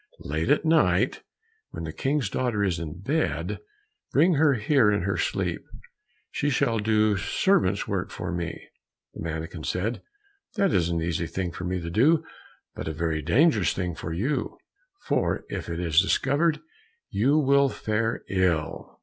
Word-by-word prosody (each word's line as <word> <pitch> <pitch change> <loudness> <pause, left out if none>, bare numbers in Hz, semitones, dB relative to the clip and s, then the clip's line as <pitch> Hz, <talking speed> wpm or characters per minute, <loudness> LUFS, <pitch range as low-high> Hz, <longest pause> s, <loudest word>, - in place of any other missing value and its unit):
"Late - - -2
at - - +3
night, - - +3 0.5
when - - -7
the 80 -1 -5
King's 135 -3 0
daughter 115 -1 -1
is 90 -5 0
in 85 +1 -7
bed, 100 - -1 0.5
bring 165 +6 +4
her 145 -2 +4
here 130 -1 +3
in 100 -4 0
her 100 +1 0
sleep, - - -1 0.7
she 145 - 0
shall 115 -4 +1
do 105 0 +2
servant's 100 - +1
work - - -2
for - - -5
me." 85 -1 -5 0.5
The - - -9
mannikin 80 0 -5
said, 105 +10 -2 0.5
"That 195 -4 +2
is 85 -2 +2
an 85 -1 -1
easy 85 0 -1
thing 90 0 -3
for 90 - -6
me 90 +1 -1
to 85 0 -5
do, 145 - +4 0.5
but - - -6
a 80 - -2
very 80 -1 -1
dangerous 110 - +3
thing 90 -2 -3
for 80 - -6
you, 115 - -2 0.5
for - - 0
if - - -5
it 85 0 -3
is 85 -1 +4
discovered, 140 - +1 0.5
you 135 +9 +2
will 140 -1 +4
fare 110 -1 -2
ill." 90 -5 -1
100 Hz, 160 wpm, -26 LUFS, 85-135 Hz, 0.7 s, bring